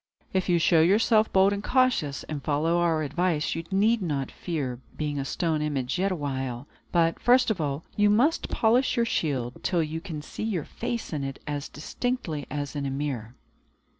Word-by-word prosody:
If 185 0 0
you 175 - +4
show 165 0 +4
yourself 215 +5 +4
bold 195 +1 +5
and 200 +1 -4
cautious, 250 - +1
and 150 -2 -5
follow 160 +4 +1
our 165 -2 +2
advice, 155 +2 0
you 165 - -4
need 210 +4 +3
not 145 -7 -2
fear 140 -8 -3 0.2
being 145 -2 -2
a 135 - -2
stone 160 +1 -1
image 145 0 -1
yet 195 +1 +1
awhile. 135 -6 -3 0.3
But, 165 -1 +2
first 250 -1 +4
of 190 - -2
all, 145 +1 -2
you 205 0 +4
must 255 +11 +2
polish 240 +4 +2
your 235 - +3
shield, 130 - -1
till 175 -3 +2
you 160 +1 -4
can 160 -5 -6
see - - -8
your 210 -8 -1
face 235 -7 -4
in 145 -2 -2
it 135 0 -4
as 145 -1 -4
distinctly 160 - -3
as 145 0 -4
in 140 -1 -2
a - - -1
mirror." 135 -4 -4
160 Hz, 190 wpm, -27 LUFS, 145-195 Hz, 0.3 s, bold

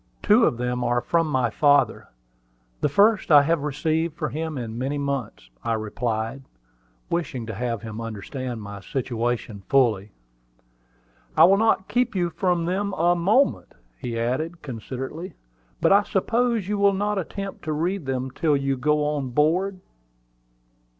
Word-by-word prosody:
Two 225 +3 +5
of 120 - +1
them 125 0 -2
are 120 0 +2
from 165 +5 +1
my 130 -6 +1
father 145 +3 +3 0.7
the 150 - +1
first 205 +7 +3
I 145 -3 +8
have 165 +1 +1
received 155 +2 -1
from 150 - -2
him 160 0 -3
for 120 -4 -4
many 130 +6 -3
months," 140 - -4
I 115 - 0
replied, 110 +3 -3 0.7
wishing 155 -8 -2
to 110 - -5
have 115 0 -3
him 110 0 -6
understand 115 +2 -5
my 100 0 -8
situation 120 -2 -3
fully. 110 -7 +2 1.3
"I - - +8
will 195 +3 +7
not 220 -3 +2
keep 245 -2 0
you 175 -2 0
from 175 -2 0
them 195 +3 -1
a 175 0 +2
moment," 210 +11 +1 0.2
he 115 - -5
added, 155 +9 -2
considerately. 135 - -6 0.5
"But - - +5
I 200 - +6
suppose 225 +1 0
you 205 0 -1
will 200 0 +4
not 205 +1 0
attempt 195 +2 -6
to 155 - -2
read 165 +1 -2
them 130 0 -2
till 150 +1 +1
you 135 -1 -1
go 150 +3 +1
on 145 -3 -1
board?" 180 +8 +1
145 Hz, 155 wpm, -24 LUFS, 120-180 Hz, 1.3 s, I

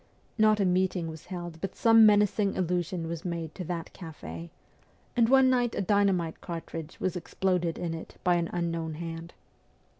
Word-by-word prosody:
Not 215 -1 +4
a 200 - +3
meeting 180 -2 +1
was 160 -1 -10
held 175 -3 -7
but 195 - -4
some 225 -1 +7
menacing 205 -1 +3
allusion 175 -1 -1
was 165 0 -5
made 170 -4 -4
to 185 - -6
that 170 -1 -5
cafe, 85 - -8 0.7
and 230 -1 +4
one 265 0 +6
night 245 -2 +2
a - - 0
dynamite 190 -4 +1
cartridge 165 -2 -7
was 185 - -1
exploded 180 -1 -1
in 170 -2 -3
it 165 - -8
by 180 - +4
an 170 -1 -1
unknown 165 -2 -2
hand. 165 +1 -7
175 Hz, 170 wpm, -28 LUFS, 165-195 Hz, 0.7 s, some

